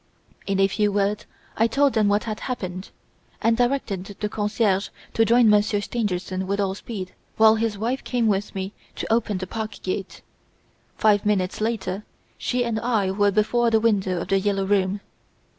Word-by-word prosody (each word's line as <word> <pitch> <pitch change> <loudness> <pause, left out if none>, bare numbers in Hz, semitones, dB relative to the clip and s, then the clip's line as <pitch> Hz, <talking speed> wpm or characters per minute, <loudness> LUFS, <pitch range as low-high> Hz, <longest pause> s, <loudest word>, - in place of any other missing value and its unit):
In 195 -1 0
a 195 - +5
few 205 +1 +1
words 205 +1 0 0.3
I 225 - +3
told 275 +3 +2
them 215 -2 +3
what 205 +1 +2
had 215 -2 -4
happened, 185 -7 -5 0.5
and 230 0 +3
directed 240 -6 0
the 210 - -1
concierge 205 -2 0 0.2
to 225 - +4
join 235 +1 +5
Monsieur 210 0 +3
Stangerson 190 -4 -2
with 200 +1 -1
all 195 -1 +1
speed, 195 -3 -7 0.2
while 220 0 +7
his 220 -2 -1
wife 240 +6 -2
came 245 -2 0
with 205 -1 0
me 190 +1 -4 0.2
to - - -1
open 220 -3 +1
the 185 - -4
park 220 +2 -5
gate. 190 +1 -4 0.7
Five 210 -2 +3
minutes 205 -2 0
later 210 -3 -2 0.4
she 250 0 0
and 225 -2 -1
I 220 -5 +1
were 205 +1 +3
before 220 +4 +2
the 225 -1 +3
window 195 -5 +1
of 175 - -5
"The 195 0 +3
Yellow 195 0 0
Room". 195 0 +1
210 Hz, 175 wpm, -24 LUFS, 195-225 Hz, 0.7 s, while